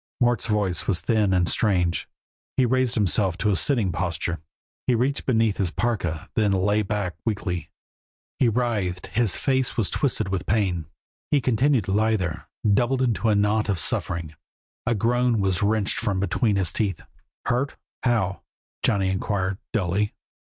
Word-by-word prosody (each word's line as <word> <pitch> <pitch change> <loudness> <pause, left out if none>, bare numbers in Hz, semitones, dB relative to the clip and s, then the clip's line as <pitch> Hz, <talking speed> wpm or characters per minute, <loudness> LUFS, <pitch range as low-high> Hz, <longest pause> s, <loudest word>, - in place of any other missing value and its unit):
Mort's 120 -3 +2
voice 100 -5 0
was 90 -4 +2
thin 110 -4 +2
and 90 -2 +2
strange; 90 -6 +1 0.5
he 130 - +4
raised 130 0 +1
himself 95 -3 +2
to 105 +1 +1
a - - +2
sitting 115 -5 +2
posture, 85 0 -2 0.5
and 120 -3 +3
reached 135 +3 0
beneath 115 -5 +2
his 95 -3 +1
parka, 85 -7 -2
then 105 -2 +2
lay 100 +2 +2
back 100 -3 -2
weakly. 100 -6 -2 0.7
He 125 - +4
writhed, 105 -6 -1
his 110 -4 +3
face 130 -2 0
was 110 -5 +1
twisted 125 -8 0
with 95 -1 -3
pain. 95 -7 0 0.4
He 145 - +3
continued 130 0 +2
to 95 - -4
lie 110 +2 +3
there, 90 -6 -4 0.2
doubled 125 +5 +2
into 115 -2 +1
a 105 - +3
knot 105 +1 +1
of 100 - +1
suffering. 85 -1 0 0.5
A 120 - +2
groan 120 +2 +2
was 95 -3 +1
wrenched 105 -1 +1
from 100 -5 -1
between 105 +2 +1
his 95 -4 +1
teeth. 100 -6 -1 0.4
"Hurt? 130 +4 0 0.3
How?" 110 -6 0 0.4
Johnny 95 -2 +2
inquired, 95 0 -1
dully. 105 0 0
105 Hz, 160 wpm, -24 LUFS, 95-120 Hz, 0.7 s, he